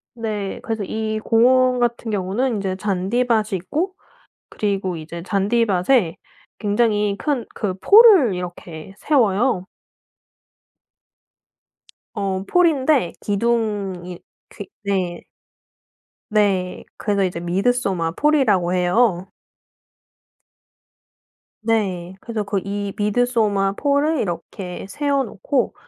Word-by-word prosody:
네. 210 -4 -4
그래서 225 -3 -3
이 220 +2 -3
공원 250 +2 +4
같은 235 -1 -1
경우는 210 +6 -1
인제 195 -2 -2
잔디밭이 210 +2 0
있고 330 - -3 0.6
그리고 195 -4 -2
이제 165 +2 -8
잔디밭에 200 -1 +1 0.4
굉장히 210 -1 +1
큰 280 -6 -1
그 195 -4 -2
폴을 400 - +7
이렇게 175 0 -8
세워요. 225 -7 +1 2.5
어 195 -2 -2
폴인데 305 - +2
기둥이 200 -5 -1 0.3
그 - - -8 0.2
네. 185 -3 -2 1.1
네. 195 -4 +1
그래서 200 -2 0
이제 175 -2 -2
미드소마 185 -1 0
폴이라고 210 - +2
해요. 180 +1 +2 2.3
네. 190 -5 -1
그래서 225 -3 -3
그 200 -1 -1
이 200 0 -4
미드소마 210 -2 +1
폴을 285 +4 +1
이렇게 180 +1 -5
세워 280 +1 0
놓고 240 +3 -2
205 Hz, 200 characters per minute, -21 LUFS, 190-240 Hz, 2.5 s, 폴을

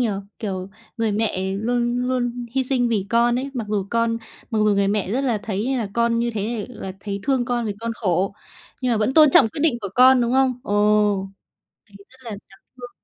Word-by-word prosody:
nhỉ. 240 - +2 0.3
Kiểu, 190 -3 -4 0.3
người 225 -2 0
mẹ 190 -3 -1
luôn 240 +3 0
luôn 245 -1 -2
hy 265 0 +1
sinh 250 -2 +1
vì 205 -4 0
con 240 +1 +3
ấy, 275 +2 -4
mặc 235 -4 -3
dù 205 -2 -1
con 230 -1 +1 0.3
mặc 225 - 0
dù 210 - +3
người 200 0 +2
mẹ 200 -2 -1
rất 250 +6 0
là 240 -5 +1
thấy 210 -1 -2
như 265 -1 0
là 220 - -2
con 235 0 +2
như 235 0 0
thế 215 +1 -3
là 195 -6 -7
thấy 200 -1 -4
thương 265 -1 +1
con 240 -1 -1
vì 210 - -1
con 230 0 -3
khổ, 190 -3 0 0.5
nhưng 250 -1 +1
mà - - +2
vẫn 220 +5 0
tôn 310 -2 +7
trọng 250 -4 +6
quyết 290 - -7
định 290 -6 +2
của 200 - -4
con, 255 0 +6
đúng 235 0 0
không? 260 -1 +2
Ồ, 205 -1 +2 0.6
thì 205 -2 -21
rất 260 - -21
là 235 - -7
đáng 200 -1 -12 0.2
thương. 245 -1 -9
230 Hz, 230 wpm, -22 LUFS, 205-245 Hz, 0.6 s, tôn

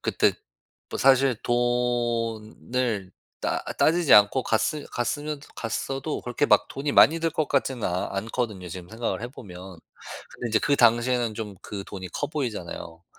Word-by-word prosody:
그때 - - +2 0.6
뭐 - - -4
사실 135 -2 +4
돈을 120 -3 -1 0.3
따 - - -1 0.2
따지지 165 -3 +3
않고 105 +5 +6
갔으 145 +7 0
갔으면 145 +5 -2 0.2
갔어도 135 +6 -3
그렇게 125 +4 -1
막 - - +4
돈이 140 +2 -3
많이 160 +3 +6
들 165 0 +1
것 155 -1 -1
같지는 130 -4 0
아 90 +1 -1
않거든요 110 -2 -3
지금 90 +1 -8
생각을 115 +1 -3
해 120 - -4
보면. 95 -7 -11 0.6
근데 120 - -5
인제 110 0 +3
그 145 +3 +2
당시에는 120 -1 +3
좀 105 -2 -6
그 100 -2 -6
돈이 95 -2 -7
커 - - -3
보이잖아요. 100 - -5
120 Hz, 300 characters per minute, -25 LUFS, 105-135 Hz, 0.6 s, 않고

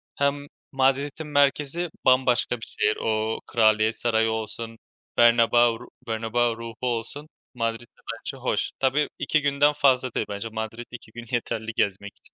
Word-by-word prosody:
hem 140 0 0 0.2
Madrid'in 140 +3 0
merkezi 145 +3 +1 0.2
bambaşka 130 -1 +3
bir 110 - -8
şehir. 105 - +2
O 110 0 -1
Kraliyet 110 -1 +3
Sarayı 110 -1 +2
olsun, 110 +1 -4 0.4
Bernabéu 120 0 +5
ru - - -12 0.2
Bernabéu 115 +1 0
ruhu 115 0 -8
olsun; 120 +5 -3 0.3
Madrid 115 -2 -2
de - - -29 0.2
bence 135 - -6
hoş. 130 - -1
Tabii 135 +3 +2
2 150 +2 +1
günden 145 +1 +3
fazla 130 -4 +2
değil - - -1
bence. 100 +2 -4
Madrid 110 +2 -5
2 120 -2 -10
gün 120 +1 -9
yeterli 115 -2 -2
gezmek 100 +1 -1
için. - - -20
120 Hz, 150 wpm, -25 LUFS, 115-135 Hz, 0.4 s, Bernabéu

